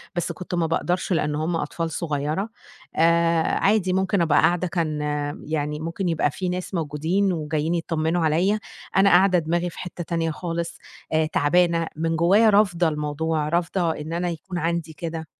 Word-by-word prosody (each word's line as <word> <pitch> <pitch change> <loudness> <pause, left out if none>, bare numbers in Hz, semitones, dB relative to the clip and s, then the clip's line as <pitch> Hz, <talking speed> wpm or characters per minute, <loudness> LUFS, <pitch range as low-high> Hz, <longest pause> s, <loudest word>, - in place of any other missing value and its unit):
بس 175 0 -1
كنت 180 +1 -5
ما 170 -1 +1
باقدرش 175 +3 0
لأنه 150 -2 0
هم 170 +1 -1
أطفال 165 +1 -3
صغيرة، 155 +5 -2 0.5
آآ، 170 0 +3 0.2
عادي 195 -3 +2
ممكن 190 0 +1
أبقى 155 -3 +4
قاعدة، 175 +1 +2
كان 160 -4 -2 0.4
يعني 150 -1 -2
ممكن 170 +3 -3
يبقى 155 -3 +1
في 185 +4 -3
ناس 180 +1 -4
موجودين 165 +4 0
وجايين 155 +1 -1
يطمنوا 165 0 0
عليَّ، 180 +7 +2 0.4
أنا 195 +1 +6
قاعدة 185 0 +5
دماغي 170 +2 -1
في - - -12
حتّة 180 -1 -6
تانية 165 0 -1
خالص، 170 +1 -4 0.4
آآ، 160 0 +3
تعبانة، 165 +2 +2
من 165 +1 -1
جوايا 195 +7 +5
رافضة 190 -5 +3
الموضوع، 150 0 -1
رافضة 170 +1 0
إن 155 +1 -6
أنا 175 +1 -1
يكون 175 +2 -6
عندي 170 -1 -2
كده. 160 0 -5
170 Hz, 165 wpm, -24 LUFS, 160-180 Hz, 0.5 s, أنا